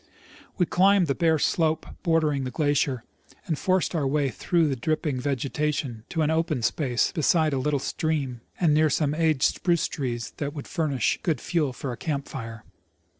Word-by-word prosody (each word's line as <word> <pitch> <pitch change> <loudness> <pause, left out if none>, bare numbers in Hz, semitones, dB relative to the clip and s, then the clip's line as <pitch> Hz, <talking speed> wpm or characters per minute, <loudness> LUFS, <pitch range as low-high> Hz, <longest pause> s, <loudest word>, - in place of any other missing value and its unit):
We 180 - +3
climbed 190 +2 +4
the 140 - 0
bare 160 +1 +2
slope 160 +1 +1 0.2
bordering 155 -5 +1
the 130 - -3
glacier, 140 -3 0 0.4
and 160 - -1
forced 185 +5 +1
our 150 -5 0
way 140 0 +1
through 170 +4 +1
the 140 - 0
dripping 145 +1 -1
vegetation 140 -2 -2
to 160 -2 0
an 155 - +1
open 160 -6 0
space 125 +2 +1
beside 160 -2 +2
a 135 - 0
little 145 +2 +1
stream 140 -4 -2 0.2
and 165 -4 +3
near 155 +1 +4
some 145 +1 +1
aged 155 -3 +1
spruce 170 -3 +2
trees 120 -5 -4
that 145 0 -4
would 145 - -6
furnish 150 -6 0
good 160 -4 0
fuel 155 -6 0
for 130 +1 -5
a 120 - -6
camp 145 -3 -3
fire. 115 -3 -7
150 Hz, 175 wpm, -26 LUFS, 135-160 Hz, 0.4 s, climbed